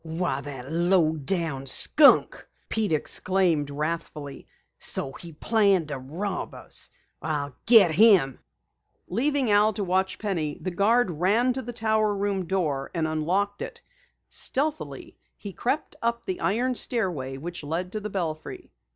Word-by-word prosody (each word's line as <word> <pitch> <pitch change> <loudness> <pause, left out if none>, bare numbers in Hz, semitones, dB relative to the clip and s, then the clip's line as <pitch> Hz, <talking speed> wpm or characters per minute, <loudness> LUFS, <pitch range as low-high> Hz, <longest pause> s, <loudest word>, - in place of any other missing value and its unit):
"Why, 160 -4 -2
the 140 -3 -8
low 170 +1 +2
down 150 -3 -3
skunk!" 290 - +5 0.2
Pete 220 -4 -1
exclaimed 165 -1 0
wrathfully. 150 -1 -5 0.3
"So 135 - -3
he 170 +4 -11
planned 195 -1 +2
to 140 -2 -4
rob 175 +9 -5
us! - - -7 0.3
I'll 145 -3 -3
get 220 -7 +7
him!" 180 - +5 0.7
Leaving 265 +3 0
Al 210 +1 +4
to 200 - -3
watch 190 0 0
Penny, 170 -8 -3
the 185 - -4
guard 210 +4 +2
ran 205 +10 +2
to 265 - -4
the 245 - -6
tower 220 -2 +1
room 200 -2 -1
door 155 -8 -1
and 160 -2 0
unlocked 185 +6 -1
it. - - -6 0.5
Stealthily 300 +3 -3 0.2
he 200 -2 -8
crept 275 - -2
up 235 0 -1
the 370 -2 -3
iron 245 +6 +1
stairway 175 - -1
which 170 +3 -7
led 170 +5 -3
to 215 - -3
the 210 0 -5
belfry. 165 -6 -5
185 Hz, 140 wpm, -25 LUFS, 155-215 Hz, 0.7 s, get